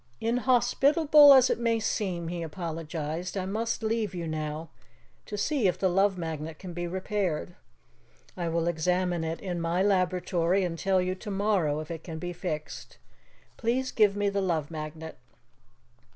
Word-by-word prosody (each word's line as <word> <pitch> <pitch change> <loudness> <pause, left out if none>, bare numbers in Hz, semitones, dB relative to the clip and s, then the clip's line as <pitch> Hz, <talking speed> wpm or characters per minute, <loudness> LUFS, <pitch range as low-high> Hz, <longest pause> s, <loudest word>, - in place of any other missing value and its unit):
"Inhospitable 270 +6 +5
as 260 -2 +7
it - - -1
may 230 -1 +1
seem," 185 -6 -2
he 175 0 -4
apologized, 165 +1 -4
"I 185 - -2
must 225 +4 -2
leave 220 -3 -1
you 170 -1 -4
now 155 0 -4 0.6
to 210 - -5
see 255 0 +1
if 180 - 0
the 190 - +1
Love 195 +1 +2
Magnet 160 -2 -5
can 185 0 -8
be 175 0 -3
repaired. 185 - -2 0.8
I 170 -2 -2
will 165 0 0
examine 175 +1 0
it 160 +1 -3
in 175 -3 -4
my 170 +3 +1
laboratory 185 -1 +1
and 175 -2 -2
tell 190 -1 +2
you 185 0 -1
tomorrow 195 -6 0
if 155 - -8
it 165 -1 -6
can 160 -2 -7
be 175 +2 -5
fixed. 160 -4 -6 0.6
Please 255 +3 0
give 210 -3 +3
me 205 0 0
the 200 0 -1
Love 165 -5 -1
Magnet." 155 0 -7
180 Hz, 160 wpm, -28 LUFS, 165-205 Hz, 0.8 s, as